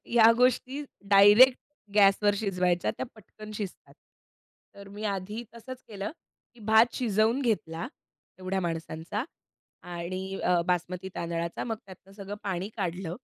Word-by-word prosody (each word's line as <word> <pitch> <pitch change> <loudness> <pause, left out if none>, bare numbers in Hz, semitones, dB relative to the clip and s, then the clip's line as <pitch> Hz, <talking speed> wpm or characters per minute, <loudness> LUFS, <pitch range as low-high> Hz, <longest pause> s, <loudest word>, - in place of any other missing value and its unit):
या 230 -1 +8
गोष्टी 255 +3 +2 0.3
डायरेक्ट 205 +6 +8 0.4
गॅसवर 205 0 +5
शिजवायच्या 180 -4 0
त्या - - -3
पटकन 215 0 -12
शिजतात. 205 -3 -7 0.8
तर 200 0 -11
मी 205 +2 -8
आधी 205 +3 -3
तसंच 255 +2 -9
केलं. 205 -2 -5 0.4
की - - -18
भात 220 +2 +5
शिजवून 225 +1 +2
घेतला. 210 -5 -1 0.5
एवढ्या 185 +1 -2
माणसांचा 165 +4 -3 0.6
आणि 185 +2 -5
अ, 180 -1 +3
बासमती 180 +1 -1
तांदळाचा 170 0 -3
मग 225 - -2
त्यातनं 190 0 -14
सगळं 200 0 -7
पाणी 190 0 -3
काढलं. 180 -2 -3
195 Hz, 125 wpm, -28 LUFS, 180-220 Hz, 0.8 s, या